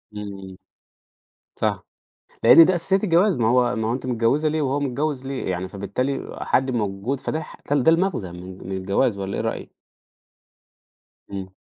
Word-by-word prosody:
إمم. 95 -2 -8 1.0
صح. - - 0 0.6
لأن 165 - +9
دي 185 - +2
أساسيّات 190 +4 +1
الجواز، 185 +1 +3
ما 115 -2 +1
هو 125 0 +3
ما 110 0 -1
هو - - +1
أنتِ 130 +1 -4
متجوّزة 125 +6 +1
ليه 155 0 -1
وهو 140 +1 0
متجوّز 140 0 -2
ليه؟ 135 -7 -3
يعني 90 +1 -3
فبالتالي 100 +8 -3
حد 130 0 +1
موجود 110 +3 -2
فده 155 - -2
ح - - -11
ده 145 - +3
ده 145 +3 +4
المغزى 165 - 0
من 90 +1 -9
من 95 - -3
الجواز 100 +3 0
والّا 100 0 -4
إيه - - -2
رأيِك؟ - - -4 1.6
إمم. 95 -1 -6
125 Hz, 165 wpm, -23 LUFS, 100-145 Hz, 1.6 s, لأن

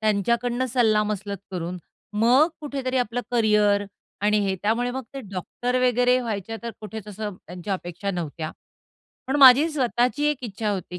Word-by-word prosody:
त्यांच्याकडून 235 +4 +1
सल्लामसलत 210 -4 +1
करून 180 -1 -4 0.4
मग 255 +7 +5
कुठेतरी 270 -3 -3
आपलं 245 0 -1
करिअर 210 -3 +3 0.4
आणि 210 +1 +3
हे. 190 - 0
त्यामुळे 230 +4 +1
मग 265 +1 -4
ते 275 - -4
डॉक्टर 240 +7 -2
वगैरे 250 +1 +3
व्हायच्या 225 -2 -4
तर 235 - -4
कुठेच 215 -1 -8
असं 205 -1 -5
त्यांच्या 180 +3 -5
अपेक्षा 180 +2 -5
नव्हत्या. 160 -3 -4 0.8
पण 265 +2 0
माझी 275 +2 +8
स्वतःची 255 -1 0
एक 265 -4 -4
इच्छा 215 -1 -3
होती, 180 -2 -4
220 Hz, 150 wpm, -24 LUFS, 200-250 Hz, 0.8 s, माझी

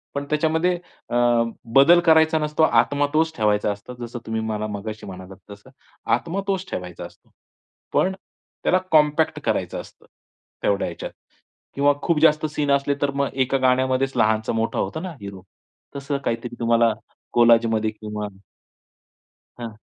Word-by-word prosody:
पण 140 0 -2
त्याच्यामध्ये 160 +3 +1 0.3
अ, 120 - -3 0.6
बदल 165 +6 +7
करायचा 160 -1 +5
नसतो, 150 +1 0
आत्मा 145 -2 +3
तोच 160 +1 +2
ठेवायचा 105 -1 +2
असतो, 100 +5 -8
जसं 120 +1 -7
तुम्ही 110 0 -2
मला 110 -1 -3
मगाशी 105 +1 -6
म्हणालात 95 0 -10
तसं 100 +5 -13 0.5
आत्मा 180 +4 -4
तोच 190 -1 -1
ठेवायचा 90 -1 -6
असतो. - - -16 0.6
पण 190 - +2 0.5
त्याला 185 - +3
कॉम्पॅक्ट 155 0 +3
करायचं - - -1
असतं. - - -18 0.6
तेवढ्या 100 -1 +1
ह्याच्यात - - -6 0.6
किंवा 145 +1 +4
खूप 170 -3 +1
जास्त 155 -1 +4
सीन 150 -2 -1
असले, 140 0 +2
तर 145 -1 +1
मग 140 0 0
एका 135 0 +1
गाण्यामध्येच 130 +1 +1
लहानचा 110 -1 +2
मोठा 115 0 -1
होतो 160 - -2
ना 185 +1 -5
हीरो. 100 -2 -9 0.5
तसं 140 0 -3
काहीतरी 115 +1 -3
तुम्हाला 115 -1 +3 0.4
कोलाजमध्ये 115 -2 +4
किंवा 105 -1 -6 1.3
हां, 120 -1 -5
130 Hz, 140 wpm, -22 LUFS, 110-150 Hz, 1.3 s, बदल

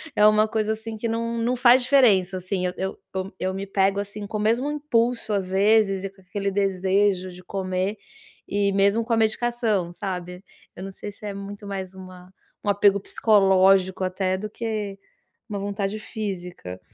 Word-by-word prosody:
é 210 - +5
uma 215 0 +5
coisa 215 0 -1
assim, 220 0 -7
que 225 +2 -3
não 230 +1 -2
não 240 +2 0
faz 245 +1 +6
diferença 205 -9 +4
assim, 185 0 -2
eu 180 - -1
eu 190 0 -3 0.2
eu 190 +1 -4
eu 185 0 -1
me 195 +1 -5
pego, 195 0 +1
assim, 205 +1 -5
com 215 +1 -4
o - - -4
mesmo 235 +7 +1
impulso 245 -6 0
às 195 -2 -1
vezes, 195 0 +3
e - - -3
com 195 0 -22
aquele 200 +2 -3
desejo 195 -1 +1
de 180 +1 -13
comer, 190 +2 -2 0.5
e 200 0 +1
mesmo 200 +3 +3
com 235 - -1
a - - +3
medicação, 220 -5 0
sabe. 180 -1 -5 0.3
Eu 185 - -8
não 195 - -6
sei 205 +2 -8
se 210 - -12
é 205 - -4
muito 200 +1 -8
mais 190 -2 -5
uma 185 -1 -12 0.3
um 205 - -1
apego 200 0 +4
psicológico, 190 -2 +3
até, 185 0 -1
do 210 +3 -5
que 210 -3 -4 0.5
uma 205 -1 -3
vontade 200 +1 -3
física. 180 - -6
200 Hz, 185 wpm, -24 LUFS, 190-215 Hz, 0.5 s, faz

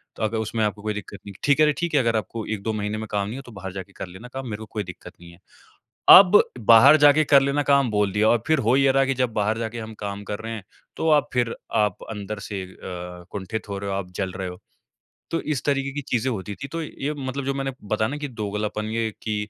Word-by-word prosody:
तो - - -5
अगर 110 +1 0
उसमें 110 0 -1
आपको 105 0 -3
कोई 110 0 -2
दिक्कत 100 -1 -7
नहीं 100 - -8
है। - - -18
ठीक 145 +1 +3
है 155 - +7
रे 150 - +3
ठीक 170 -2 -2
है 145 - +5
अगर 115 -2 +1
आपको 110 +1 -3
1-2 110 +2 -3
महीने 105 0 -2
में 110 0 -5
काम 100 -1 0
नहीं 115 - -5
है - - -6
तो 120 - -12
बाहर 95 -2 -7
जाके 95 0 -8
कर - - -7
लेना 95 +7 -11
काम, 135 -1 -5
मेरे 105 - -4
को 110 - -7
कोई 105 - -2
दिक्कत 90 -2 -11
नहीं 85 0 -12
है। 85 - -18 0.8
अब 195 +1 +7 0.3
बाहर 135 +7 +9
जाके 145 +1 +6
कर 140 - +9
लेना 140 +1 +1
काम 140 -4 +3
बोल 105 -1 +1
दिया 110 +1 +3
और 120 -2 +3
फिर 155 -2 +3
हो 125 - +5
ये 135 -1 +4
रहा 135 0 +3
है 135 - +2
कि 135 - +1
जब 125 -3 0
बाहर 105 +1 0
जाके 115 +1 -4
हम 110 0 -7
काम 100 0 -5
कर 105 +1 -5
रहे 115 +1 -5
हैं 105 -4 -7 0.3
तो 160 - +1
आप 145 -1 +3
फिर 120 -2 0 0.3
आप 105 -3 -1
अंदर 105 -1 -5
से 100 -3 -4
अ, 90 -1 -8
कुंठित 100 +3 -5
हो 100 - -3
रहे 100 0 -4
हो, 95 - -1
आप 90 -2 -5
जल 95 +1 -2
रहे 95 +1 -5
हो। 90 0 -8 0.7
तो 165 - 0
इस 150 -4 -2
तरीके 140 -1 0
की 145 - -3
चीज़ें 125 +1 0
होती 105 -1 -4
थी। 135 - -4
तो 165 +3 -4
ये 150 -1 -4
मतलब 140 -1 -4
जो 140 - 0
मैंने 135 0 -2 0.2
बताया 110 0 +2
ना 145 - -4
कि 150 -1 -4
दोगलापन 105 -2 -3
ये 115 -1 -1
कि 110 -1 -2
110 Hz, 275 wpm, -24 LUFS, 100-135 Hz, 0.8 s, बाहर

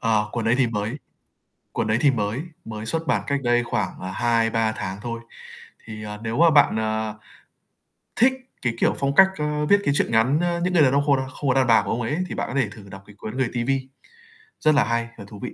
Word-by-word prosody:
À, 110 -2 +2
cuốn 115 -2 -2
đấy 115 - +3
thì 130 - +4
mới 110 +3 -3 0.8
cuốn - - -2
đấy 110 +1 +2
thì 140 - +5
mới 110 +2 -2 0.2
mới 110 0 -6
xuất 165 +7 -3
bản - - +1
cách 140 -1 0
đây 120 0 +2
khoảng, 105 -4 -3
à, 95 +1 -5
2-3 115 -1 +1
tháng 95 -2 -5
thôi. 115 +1 -5 0.6
Thì, 110 -1 -8
ờ, 105 0 -6
nếu 115 +2 -3
mà 170 +1 +6
bạn, 145 -6 +5
ờ, 110 0 -2 1.0
thích 255 +3 +4 0.3
cái, 125 -3 0
kiểu, - - +2
phong 140 0 0
cách, 190 - +8
ưm, 150 0 -1
viết 200 +4 +5
cái 140 - +2
truyện - - 0
ngắn, 120 +7 +3
a, 175 0 0
"Những 180 +1 0
Người 165 -4 +5
Đàn 130 - +4
Ông 140 +1 +3
Khô 145 -1 +4
Đa 130 0 -3
Không 135 +1 -4
Có - - +4
Đàn 130 -2 +3
Bà" 115 -2 +5
của - - -6
ông 120 - -1
ấy 120 +7 -2
thì - - -5
bạn - - -3
có - - -5
thể 110 - -2
thử 100 -2 -13
đọc 95 0 -11
cái 105 - -15
cuốn 110 +4 -7
"Người 130 -3 +1
TV" 120 +1 -3 0.9
rất 155 -2 +3
là - - +5
hay 115 0 -1
và 100 - -9
thú 105 - -11
vị. - - -6
115 Hz, 250 wpm, -23 LUFS, 110-140 Hz, 1.0 s, cách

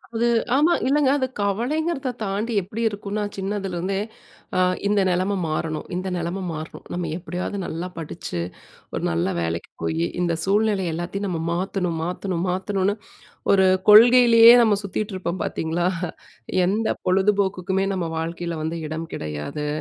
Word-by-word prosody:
அது, 235 +1 +2 0.3
ஆமா, 310 +5 +4
இல்லங்க, 285 0 +3
அது 260 - 0
கவலைங்கிறத 265 - -1
தாண்டி 210 +4 -2
எப்படி 205 +5 -6
இருக்குன்னா, 205 0 -3
சின்னதுல 195 -1 -3
இருந்தே, 190 +3 -1 0.6
அ - - +3 0.3
"இந்த 205 0 +3
நிலைமை 185 +3 0
மாறணும். 155 0 -2
இந்த 185 +1 -3
நிலைமை 175 +3 -3
மாறணும். 155 +1 -8
நம்ம 175 -2 -2
எப்பிடியாவது 185 +2 -4
நல்லா 170 +3 -4
படிச்சு, 160 - -5 0.5
ஒரு - - -3
நல்ல 85 +2 0
வேலைக்கு 85 0 -3
போயி, 80 0 0 0.2
இந்த 170 -2 +1
சூழ்நிலை 205 -1 +2
எல்லாத்தையும் 175 +5 -3
நம்ம 170 -4 -2
மாத்தணும், 180 -2 -1
மாத்தணும், 180 0 -2
மாத்தணுன்னு" 195 +2 0 0.6
ஒரு 190 -1 +5 0.2
கொள்கையிலயே 235 +1 +9
நம்ம 215 -3 +3
சுத்திட்டு 200 +1 -3
இருப்போம் 180 -1 -3
பார்த்தீங்களா! 165 +2 -1 0.8
எந்த 215 +4 0 0.2
பொழுதுபோக்குக்குமே 190 0 +1
நம்ம 175 -3 -2
வாழ்க்கையில 170 +1 -3
வந்து 165 +1 -2
இடம் 160 +1 -5
கிடையாது, 75 - -4
190 Hz, 135 wpm, -23 LUFS, 170-210 Hz, 0.8 s, கொள்கையிலயே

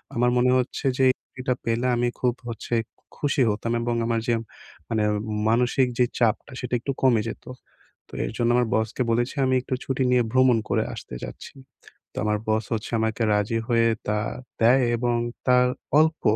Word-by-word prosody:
আমার 120 +1 +3
মনে 125 +1 +3
হচ্ছে 125 +2 -4
যে 130 - +5 0.4
এটা 125 0 +1
পেলে 115 +2 0
আমি 120 0 +1
খুব 125 -1 +2 0.2
হচ্ছে 115 +1 -6 0.2
খু - - -37
খুশি 145 -1 0
হতাম। 115 +3 -2
এবং 120 0 -1
আমার 115 -1 +1
যে 120 - +3 0.5
মানে 110 -2 +1 0.5
মানসিক 125 +3 +2
যেই 125 - +3
চাপটা 115 -1 +1
সেটা 125 -1 -5
একটু 140 - -3
কমে 120 -5 +4
যেতো। - - -9 0.6
তো - - -23
এর - - -4
জন্য 120 -1 +1
আমার 125 -1 +2
বসকে 110 +3 -1
বলেছি, 120 +4 0
"আমি 130 - +2
একটু 130 - -5
ছুটি 135 0 -1
নিয়ে 125 -1 +4
ভ্রমণ 130 -2 +4
করে 110 - +2
আসতে 105 - -8
চাচ্ছি।" - - -8 0.6
তো - - -17
আমার 105 0 +1
বস 110 -1 +1
হচ্ছে 110 0 -4
আমাকে 110 +1 0
রাজি 105 +2 0
হয়ে 115 -1 +3 0.2
তা 105 0 +1 0.4
দেয় 125 +3 +5
এবং 120 0 0 0.3
তার 125 0 +5 0.3
অল্প 160 0 +2
120 Hz, 180 wpm, -24 LUFS, 115-125 Hz, 0.6 s, যে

